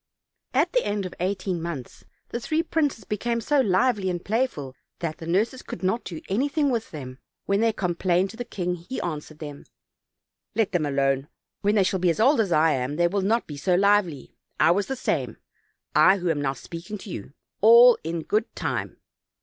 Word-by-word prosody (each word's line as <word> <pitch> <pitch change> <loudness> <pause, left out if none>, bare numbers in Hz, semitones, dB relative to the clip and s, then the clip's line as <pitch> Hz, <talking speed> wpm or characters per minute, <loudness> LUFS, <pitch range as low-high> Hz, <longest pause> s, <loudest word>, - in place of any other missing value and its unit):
At - - +2
the - - +3
end 205 -1 -2
of 185 - -6
eighteen 185 -1 -2
months 160 -7 -6 0.2
the 235 - -3
three 310 +7 0
princes 295 -9 -1
be 210 - -3
came 235 +2 -1
so 285 +6 +1
lively 210 -2 +2
and 175 -1 -4
playful 205 - -1 0.2
that 165 -2 -4
the 165 - -7
nurses 215 +9 0
could - - -8
not 190 +6 0
do 165 -3 -6
anything 280 +7 +1
with 230 -2 -2
them. 130 -4 -8 0.3
When 200 +1 +1
they 230 0 +3
complained 180 -1 0
to 225 - -13
the 245 - -3
king 180 -6 -3
he 180 +9 -6
answered 155 -2 -5
them: 145 -2 -8 0.9
"Let 225 -3 +1
them 165 -5 0
alone; 135 0 +1 0.3
when 205 +1 +2
they 200 - +5
shall 190 0 0
be 180 0 +2
as 165 - 0
old 265 +5 +4
as 205 -5 +1
I 160 0 +4
am 130 +1 -1
they 175 +2 +3
will 200 +3 -1
not 225 +5 +1
be 145 - -8
so 180 +5 +1
lively; 195 -7 +2 0.3
I - - +5
was 200 +3 +1
the 270 - -2
same, 255 - -2 0.6
I 190 +1 +6
who 180 -2 0
am 145 -2 -1
now 135 -1 0
speaking 170 +9 -8
to 195 0 -10
you. 110 +2 -7 0.3
All 235 +3 +8
in 165 0 -3
good 215 +6 -1
time." - - -3
190 Hz, 205 wpm, -25 LUFS, 165-225 Hz, 0.9 s, All